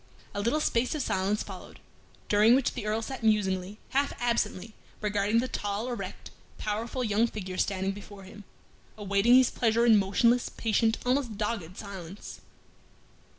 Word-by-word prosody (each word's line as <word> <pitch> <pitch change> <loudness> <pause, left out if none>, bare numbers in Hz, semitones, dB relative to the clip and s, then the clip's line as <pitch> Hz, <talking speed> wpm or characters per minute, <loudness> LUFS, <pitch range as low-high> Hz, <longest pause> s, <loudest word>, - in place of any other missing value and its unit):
A 205 - -2
little 235 +9 +1
space 250 -2 +1
of 295 - -1
silence 195 +1 0
followed, - - -10 0.5
during 210 +3 +5
which 265 -1 +1
the 210 - -5
Earl 220 +2 0
sat 265 +3 -6
musingly, 200 -3 +1
half 280 +1 +1
absently, 235 -3 -1 0.3
regarding 210 +1 +1
the 255 - -2
tall, 205 0 -3
erect, 200 -6 -6 0.3
powerful 225 +4 -3
young 220 +1 +2
figure 190 -5 -6
standing 195 -1 0
before 200 0 -10
him, 205 +2 -12 0.5
awaiting 205 +4 +3
his 255 -1 +5
pleasure 230 0 +2
in 225 -3 +7
motionless, 235 +5 +2
patient, 225 0 +1
almost 250 -4 0
dogged 200 -5 -3
silence. 195 -2 -9
215 Hz, 150 wpm, -28 LUFS, 200-235 Hz, 0.5 s, in